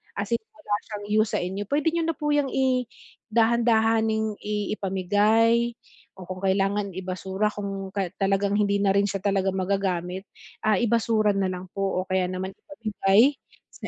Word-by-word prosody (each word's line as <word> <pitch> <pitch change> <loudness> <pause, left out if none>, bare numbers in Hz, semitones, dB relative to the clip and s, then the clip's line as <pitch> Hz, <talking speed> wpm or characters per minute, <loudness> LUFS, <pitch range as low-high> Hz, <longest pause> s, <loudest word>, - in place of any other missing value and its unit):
as 200 +1 -4
in - - -3
wala 205 - -5 0.2
siyang 205 -1 -5 0.2
use 220 - -6
sa - - +2
inyo, 190 +3 -3
puwede 290 +2 +1
nyo 335 - +1
na 330 - -1
po 295 0 -1
'yang 285 -2 +1
i-dahan-dahaning 225 -3 +1
i 210 0 -2
ipamigay, 215 +5 +2 0.5
o 180 - -9
kung 185 0 -7
kailangan 195 +1 +1
i-basura 190 +2 -2
kung 195 -1 -5 0.3
talagang 200 +1 +1
hindi 200 -1 +2
na 195 - +4
rin 200 +1 +3
siya 195 -1 -4
talaga 195 -1 +1
magagamit, 190 -1 -1 0.4
ah, 215 -1 +3
i-basura 225 -2 +2
na 195 -1 +1
lang 180 0 -5
po, 195 -2 -1
o - - -23
kaya 185 -1 +1
naman 185 +1 -4
ipamigay 225 0 +2 0.4
sa - - -8
205 Hz, 160 wpm, -25 LUFS, 195-225 Hz, 0.5 s, na